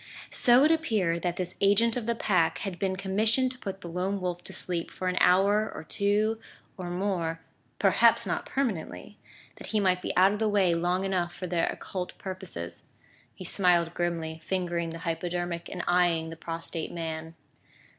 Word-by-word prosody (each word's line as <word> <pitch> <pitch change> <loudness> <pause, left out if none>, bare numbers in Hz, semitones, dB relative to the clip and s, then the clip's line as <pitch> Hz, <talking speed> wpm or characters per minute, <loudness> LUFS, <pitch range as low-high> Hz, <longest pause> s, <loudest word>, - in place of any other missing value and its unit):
So 245 +2 +6
it 310 - +5
appeared 210 - +1
that 175 -1 -1
this 180 -1 -3
agent 205 +4 +4
of 240 -3 -3
the 235 - +1
Pack 180 -7 +2
had 190 -3 -5
been 190 -2 0
commissioned 215 +7 +1
to 255 - -10
put 195 -3 -6
the 175 - -7
Lone 185 +4 -2
Wolf 180 -1 -3
to - - -6
sleep 175 -2 -1
for 185 - -5
an 180 - 0
hour 200 +4 +4
or - - -7
two 210 +5 +1 0.4
or 180 -3 -6
more 175 -3 -2 0.4
perhaps - - +4
not - - -2
permanently! 190 - -3 0.4
that - - -9
he 215 - 0
might 185 -2 +2
be - - -2
out 190 +2 +6
of 210 - -4
the 220 -1 +2
way 195 -4 +3
long 175 +3 0
enough 180 -3 -1
for 185 - -5
their 170 -2 0
occult 180 -2 -5
purposes. 185 - -7 0.5
He 185 - -9
smiled 175 -2 +3
grimly, 165 -2 -2
fingering 175 -2 -1
the 165 - -6
hypodermic 175 0 -3
and 175 -2 -5
eyeing 175 -2 +2
the - - -7
prostrate 165 0 -5
man. 160 -1 -5
180 Hz, 180 wpm, -28 LUFS, 170-200 Hz, 0.5 s, So